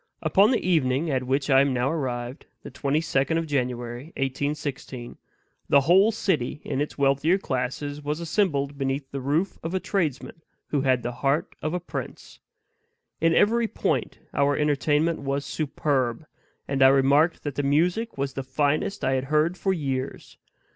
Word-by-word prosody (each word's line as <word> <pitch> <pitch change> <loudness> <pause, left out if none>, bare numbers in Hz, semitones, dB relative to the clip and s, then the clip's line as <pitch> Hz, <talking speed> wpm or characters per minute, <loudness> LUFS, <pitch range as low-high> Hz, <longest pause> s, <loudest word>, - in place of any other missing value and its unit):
Upon 200 +2 +4
the 245 -7 0
evening 150 -2 +2
at 130 -1 -1
which 135 +2 0
I 135 0 +7
am 140 -2 +1
now 125 +3 +1
arrived, 125 -4 -4 0.2
the - - -9
twenty 145 +2 0
second 155 0 0
of 165 - -1
January, 125 -3 -2
1816, 135 -2 -3 0.5
the 140 - +6
whole 190 +9 +5
city, 180 - -1
in 135 - -2
its 150 - -4
wealthier 140 +6 +3
classes, 145 -1 -3
was 150 +2 -3
assembled 155 -5 0
beneath 135 0 -2
the 140 - -4
roof 155 +8 -1
of 165 +3 -4
a - - +1
tradesman 165 -5 -2 0.3
who 145 - +1
had 130 -2 +2
the 120 - -2
heart 140 +3 +1
of 155 +3 -2
a - - -1
prince. 175 - -7 0.8
In 165 0 +3
every 230 +2 +3
point - - -2 0.2
our 140 +1 +2
entertainment 150 +2 +1
was 140 0 -2
superb; 140 -3 -1 0.4
and 135 -1 -1
I 130 - +9
remarked 140 +5 +3
that 145 - -3
the 145 - -1
music 175 +11 +1
was 135 0 -2
the 135 - -3
finest 145 +7 -1
I 130 - +2
had 130 0 0
heard 155 +4 +2
for 190 +1 0
years. 135 -6 -3
145 Hz, 170 wpm, -25 LUFS, 135-160 Hz, 0.8 s, I